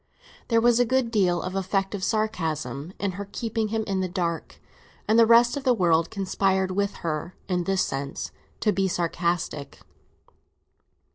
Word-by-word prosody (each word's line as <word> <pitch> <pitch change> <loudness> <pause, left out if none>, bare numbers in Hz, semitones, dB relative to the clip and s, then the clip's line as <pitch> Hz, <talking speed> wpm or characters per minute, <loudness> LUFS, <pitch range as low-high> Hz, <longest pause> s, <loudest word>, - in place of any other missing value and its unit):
There 230 -1 +3
was 240 0 +4
a - - +6
good 245 0 +1
deal 185 -6 +2
of 185 +1 -4
effective 195 +1 -1
sarcasm 165 -8 -2
in 200 -1 -1
her 200 +2 -7
keeping 225 -1 -2
him 220 +1 -1
in 195 -1 -1
the 185 -1 -1
dark, 175 -3 -3 0.5
and 220 +2 +4
the 230 - +7
rest 235 +1 +6
of 285 - -4
the 255 -2 +3
world 170 -4 +2
conspired 190 -1 0
with 200 +1 -1
her, 165 +2 -3
in 180 -2 0
this 195 0 +2
sense, 140 +1 -4 0.3
to 210 - +3
be 195 -1 +1
sarcastic. 170 -4 -2
195 Hz, 160 wpm, -25 LUFS, 175-220 Hz, 0.5 s, the